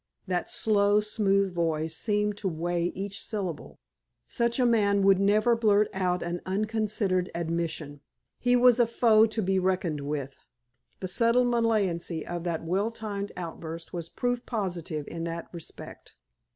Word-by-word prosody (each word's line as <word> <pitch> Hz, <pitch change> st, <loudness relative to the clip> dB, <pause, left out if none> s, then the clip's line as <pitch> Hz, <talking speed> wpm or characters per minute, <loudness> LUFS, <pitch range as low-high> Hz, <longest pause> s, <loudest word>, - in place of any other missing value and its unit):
That 180 Hz, -2 st, -2 dB
slow, 205 Hz, -1 st, +3 dB
smooth 200 Hz, -3 st, +1 dB
voice 160 Hz, -2 st, -1 dB
seemed 210 Hz, +2 st, 0 dB
to 205 Hz, -, -3 dB
weigh 170 Hz, 0 st, -1 dB
each 200 Hz, +3 st, -4 dB
syllable. 195 Hz, -7 st, -5 dB, 0.5 s
Such 235 Hz, +1 st, 0 dB
a 250 Hz, -, +4 dB
man 200 Hz, -4 st, +3 dB
would 195 Hz, -1 st, +5 dB
never 215 Hz, +4 st, +3 dB
blurt 215 Hz, -2 st, +3 dB
out 180 Hz, -2 st, 0 dB
an 170 Hz, 0 st, -3 dB
unconsidered 205 Hz, -2 st, 0 dB
admission. 165 Hz, -3 st, -3 dB, 0.4 s
He 245 Hz, 0 st, +3 dB
was 245 Hz, 0 st, +5 dB
a 240 Hz, -, +5 dB
foe 225 Hz, -1 st, +5 dB
to 220 Hz, 0 st, -2 dB
be 190 Hz, 0 st, +2 dB
reckoned 180 Hz, -5 st, 0 dB
with. 140 Hz, -1 st, -4 dB, 0.7 s
The 185 Hz, -, -2 dB
subtle 235 Hz, +6 st, +3 dB
malignancy 205 Hz, -9 st, 0 dB
of 175 Hz, 0 st, -5 dB
that 165 Hz, -2 st, -2 dB
well 195 Hz, +6 st, 0 dB
timed 205 Hz, -3 st, -5 dB
outburst 165 Hz, -1 st, -7 dB
was 170 Hz, -2 st, -5 dB
proof 245 Hz, -1 st, -2 dB
positive 175 Hz, -, -3 dB
in 165 Hz, 0 st, -5 dB
that 170 Hz, 0 st, -5 dB
respect. 170 Hz, -3 st, -10 dB
195 Hz, 150 wpm, -28 LUFS, 170-215 Hz, 0.7 s, would